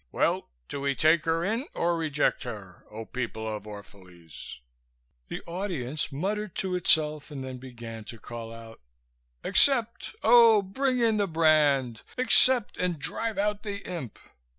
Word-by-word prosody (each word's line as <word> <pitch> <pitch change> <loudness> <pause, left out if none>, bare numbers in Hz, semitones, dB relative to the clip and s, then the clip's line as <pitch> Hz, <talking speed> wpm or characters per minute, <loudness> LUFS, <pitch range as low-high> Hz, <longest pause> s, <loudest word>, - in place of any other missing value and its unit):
Well, - - 0 0.2
do 140 - -5
we 140 0 0
take 155 +2 +3
her 165 +1 0
in 225 +7 -1
or 170 0 +1
reject 155 -3 0
her, 105 -8 -9
O 110 +1 -8
people 110 -2 -5
of 105 -1 -5
Orphalese?" 95 -8 -11 0.7
The - - -6
audience 170 -7 -3
muttered 200 +7 -3
to 190 -1 -2
itself 155 -4 +2
and 140 -3 -7
then 130 -1 -7
began 120 -3 -9
to 115 - -9
call 115 +1 -8
out: 115 - -12 0.6
"Accept! 240 -5 +3
Oh, 225 -2 +7
bring 255 +6 -1
in 225 -2 +3
the 205 -1 +1
brand! 150 - +2 0.2
Accept 250 -1 +4
and 180 -2 -1
drive 205 +9 -3
out 210 +1 0
the 205 -2 -6
imp!" 165 - -6
155 Hz, 150 wpm, -27 LUFS, -, 0.7 s, Oh